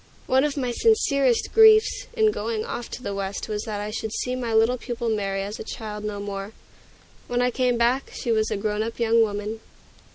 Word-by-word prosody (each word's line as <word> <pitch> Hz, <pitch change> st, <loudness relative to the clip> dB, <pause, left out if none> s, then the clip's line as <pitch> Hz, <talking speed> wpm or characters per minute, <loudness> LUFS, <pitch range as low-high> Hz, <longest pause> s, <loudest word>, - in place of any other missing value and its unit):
One 265 Hz, +1 st, +3 dB
of 295 Hz, -1 st, -1 dB
my 250 Hz, -3 st, -1 dB
sincerest 280 Hz, -, +2 dB
griefs 440 Hz, +2 st, +6 dB
in 440 Hz, -2 st, +3 dB
going 220 Hz, -, -3 dB
off 240 Hz, -, -5 dB
to 250 Hz, -, -8 dB
the 200 Hz, -, -3 dB
West 195 Hz, 0 st, -4 dB
was 210 Hz, -1 st, -3 dB
that 210 Hz, -2 st, -4 dB
I 210 Hz, +1 st, -4 dB
should 220 Hz, 0 st, -4 dB
see 250 Hz, +3 st, -2 dB
my 245 Hz, -2 st, -3 dB
little 225 Hz, +3 st, +3 dB
pupil 240 Hz, -1 st, -3 dB
Mary 195 Hz, -3 st, -1 dB
as 205 Hz, +4 st, -6 dB
a -, -, -5 dB
child 210 Hz, -1 st, -6 dB
no 210 Hz, -1 st, -4 dB
more. 200 Hz, +1 st, -5 dB, 0.7 s
When 245 Hz, -, -1 dB
I 250 Hz, -, +2 dB
came 250 Hz, -1 st, +1 dB
back, 240 Hz, +3 st, +1 dB
she 240 Hz, -, -3 dB
was 220 Hz, -1 st, +2 dB
a 215 Hz, -, -1 dB
grown 210 Hz, +1 st, -1 dB
up 225 Hz, +2 st, -4 dB
young 230 Hz, 0 st, +4 dB
woman. 210 Hz, 0 st, -2 dB
225 Hz, 215 wpm, -24 LUFS, 210-250 Hz, 0.7 s, griefs